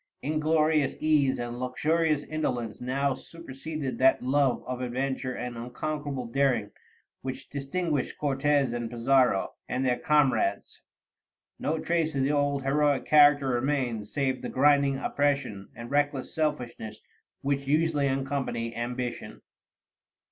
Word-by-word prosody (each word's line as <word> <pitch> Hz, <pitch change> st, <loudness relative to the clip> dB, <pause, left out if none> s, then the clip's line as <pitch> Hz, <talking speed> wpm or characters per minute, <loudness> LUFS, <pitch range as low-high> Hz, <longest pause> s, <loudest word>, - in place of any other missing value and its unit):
Inglorious 155 Hz, -1 st, +2 dB
ease 150 Hz, -4 st, +3 dB
and 120 Hz, 0 st, -5 dB
luxurious 150 Hz, +4 st, +1 dB
indolence 125 Hz, -8 st, -3 dB
now 135 Hz, +2 st, 0 dB
superseded 155 Hz, -1 st, -6 dB
that 130 Hz, -1 st, +4 dB
love 135 Hz, 0 st, +2 dB
of 125 Hz, 0 st, -4 dB
adventure 130 Hz, +1 st, -2 dB
and 125 Hz, 0 st, -5 dB
unconquerable 135 Hz, +3 st, -4 dB
daring 125 Hz, -3 st, +1 dB, 0.5 s
which 130 Hz, +1 st, -6 dB
distinguished 145 Hz, +1 st, -2 dB
Cortez 140 Hz, -2 st, +1 dB
and 120 Hz, -1 st, -3 dB
Pizarro, 125 Hz, -3 st, +2 dB, 0.2 s
and 130 Hz, +1 st, -1 dB
their 125 Hz, -1 st, +1 dB
comrades: 130 Hz, -9 st, +1 dB, 0.8 s
no 160 Hz, -, -1 dB
trace 160 Hz, -1 st, 0 dB
of 135 Hz, -, +1 dB
the 140 Hz, -, +2 dB
old 145 Hz, -1 st, +1 dB
heroic 145 Hz, 0 st, +2 dB
character 145 Hz, -2 st, +6 dB
remained 125 Hz, -4 st, -1 dB
save 135 Hz, 0 st, -1 dB
the -, -, -4 dB
grinding 140 Hz, 0 st, +3 dB
oppression 140 Hz, -10 st, -1 dB
and 120 Hz, +2 st, -8 dB
reckless 145 Hz, -2 st, 0 dB
selfishness 135 Hz, -8 st, -3 dB, 0.4 s
which 140 Hz, 0 st, -1 dB
usually 150 Hz, -1 st, +2 dB
accompany 135 Hz, -4 st, -2 dB
ambition. 120 Hz, -, -4 dB
135 Hz, 120 wpm, -28 LUFS, 125-145 Hz, 0.8 s, character